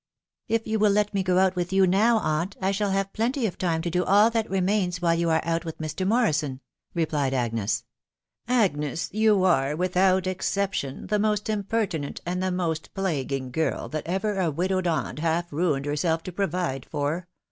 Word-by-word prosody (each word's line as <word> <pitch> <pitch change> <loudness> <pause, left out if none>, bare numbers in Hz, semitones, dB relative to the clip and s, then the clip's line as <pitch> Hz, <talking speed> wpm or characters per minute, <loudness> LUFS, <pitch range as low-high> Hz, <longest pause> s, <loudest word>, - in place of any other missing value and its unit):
" - - -68
If 225 0 0
you 220 0 -1
would 210 -1 +4
let 210 0 +1
me 195 - +1
go 185 0 +3
with 180 0 -2
you 190 0 +5
now, 215 +6 +4
aunt, 170 0 -1
I 190 +1 +1
shall 200 +1 0
have 195 0 -1
plenty 240 +3 0
of 185 - -3
time 165 -3 0
to 175 - -1
do 180 +1 +1
all 205 +5 +5
that 225 -1 -1
remains 190 -1 0
while 170 -1 +2
you 170 0 +1
are 160 0 +2
out 165 0 -1
with 160 -2 -6
Mr. 160 +4 -3
Morrison," 155 - +1 0.4
replied 150 -5 0
Agnes. 115 -4 -1 0.4
" - - -51 0.2
Agnes, 150 -3 -2
you 215 -2 +3
are, 150 -6 +2
without 185 +2 +2
exception, 185 -6 -2
the 210 +1 0
most 210 0 0
impertinent 200 -7 -2
and 180 +1 -2
the 185 - 0
most 170 -3 -2
plaguing 140 -9 -2
girl 160 +5 -1
that 155 0 -4
ever 195 +3 -1
a 175 -3 +2
widowed 185 +4 0
aunt 160 -2 -1
half 165 +1 -1
ruined 150 -3 0
herself 160 +3 0
to 185 - -6
provide 175 -7 -2
for 150 +5 -2
180 Hz, 190 wpm, -25 LUFS, 160-195 Hz, 0.4 s, you